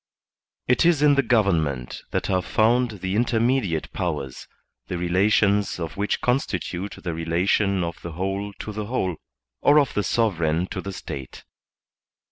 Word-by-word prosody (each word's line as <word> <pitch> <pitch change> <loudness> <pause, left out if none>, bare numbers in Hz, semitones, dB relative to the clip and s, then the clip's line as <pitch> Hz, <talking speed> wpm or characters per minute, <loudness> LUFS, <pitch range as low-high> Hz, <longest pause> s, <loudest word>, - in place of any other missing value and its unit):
It 125 - +3
is 165 -4 +4
in 145 -1 +6
the 140 - +4
government 80 - +1
that - - -1
are 95 -1 +2
found 115 0 +1
the 95 +1 -2
intermediate 115 - +1
powers, 75 -8 -4 0.4
the 90 - -3
relations 100 +3 +2
of 80 -2 -4
which 100 +1 -1
constitute 100 -6 -1
the 85 -3 -2
relation 90 +4 +1
of 85 0 -5
the 85 - -7
whole 95 +4 -3
to 110 - -6
the 105 0 -5
whole, 95 -8 -1 0.4
or 145 - +5
of 140 -4 +1
the 105 - +1
sovereign 90 -6 +1
to - - -3
the 100 - -5
State. 70 -7 -8
100 Hz, 150 wpm, -24 LUFS, 85-115 Hz, 0.4 s, in